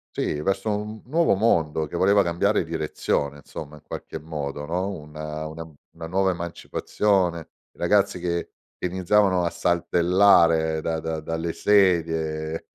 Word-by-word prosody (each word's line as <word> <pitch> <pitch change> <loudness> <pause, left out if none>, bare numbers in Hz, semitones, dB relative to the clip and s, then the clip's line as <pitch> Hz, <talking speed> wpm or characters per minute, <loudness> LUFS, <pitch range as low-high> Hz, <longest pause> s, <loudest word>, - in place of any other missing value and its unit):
Sì, 75 - -1
verso 95 +4 0
un 105 +1 -4
n 110 - -14
nuovo 160 - +2
mondo 80 -7 +1
che 75 - -8
voleva 100 +3 +4
cambiare 90 +5 +1
direzione, 75 -3 -2
insomma, 75 +2 -9
in 75 - -16
qualche - - -7
modo, 75 -2 -5
no, 90 +5 -2
una 75 -3 -6
una 80 +1 -6 0.3
una 80 - -8
nuova 95 +2 +1
emancipazione, 90 +1 -1 0.3
i - - -30
ragazzi 100 +1 +2
che 85 -1 -2 0.3
iniziavano 95 +1 +2
a 85 - 0
saltellare 85 -2 +3
da 80 0 -2
da 80 0 -3
dalle 80 +2 -3
sedie 80 -5 +1
85 Hz, 140 wpm, -24 LUFS, 80-95 Hz, 0.3 s, voleva